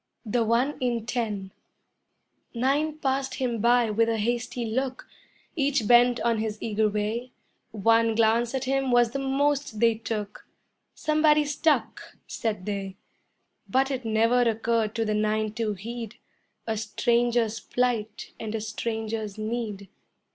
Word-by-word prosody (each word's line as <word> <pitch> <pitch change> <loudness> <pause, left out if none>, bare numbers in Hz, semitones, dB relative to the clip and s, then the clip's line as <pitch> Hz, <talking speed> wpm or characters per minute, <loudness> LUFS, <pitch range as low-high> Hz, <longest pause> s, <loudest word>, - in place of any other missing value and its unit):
THE 230 +2 +1
ONE 235 +6 +1
IN 240 -3 -1
TEN 215 -6 -3 1.0
Nine 285 +5 +1
passed 270 -2 -1
him 240 -3 -1
by 240 -1 +4
with 225 +2 +2
a 225 - 0
hasty 240 +2 -2
look, 260 +3 -3 0.5
Each 280 -7 +1
bent 245 +1 +5
on 230 -2 +1
his 215 -1 -2
eager 215 -1 +1
way; 215 +4 -3 0.4
One 225 +1 +2
glance 230 +2 +2
at 265 - -1
him 270 0 0
was 240 -1 +4
the 275 - -3
most 275 -2 0
they 230 0 +5
took, 215 -2 -5 0.5
"Somebody 305 -1 +3
stuck," 295 +2 -1
said 210 -5 -3
they; 195 -2 -4 0.7
But 265 +2 +2
it 260 -2 -3
never 225 +2 +3
occurred 225 -1 +1
to 225 -1 0
the 215 - 0
nine 215 0 0
to 220 -2 -1
heed 230 +2 -7 0.5
A 225 -1 -2
stranger's 235 +1 +1
plight 245 -4 -2
and 220 0 -4
a - - -1
stranger's 220 -1 -4
need. 215 -2 -4
230 Hz, 140 wpm, -26 LUFS, 220-250 Hz, 1.0 s, bent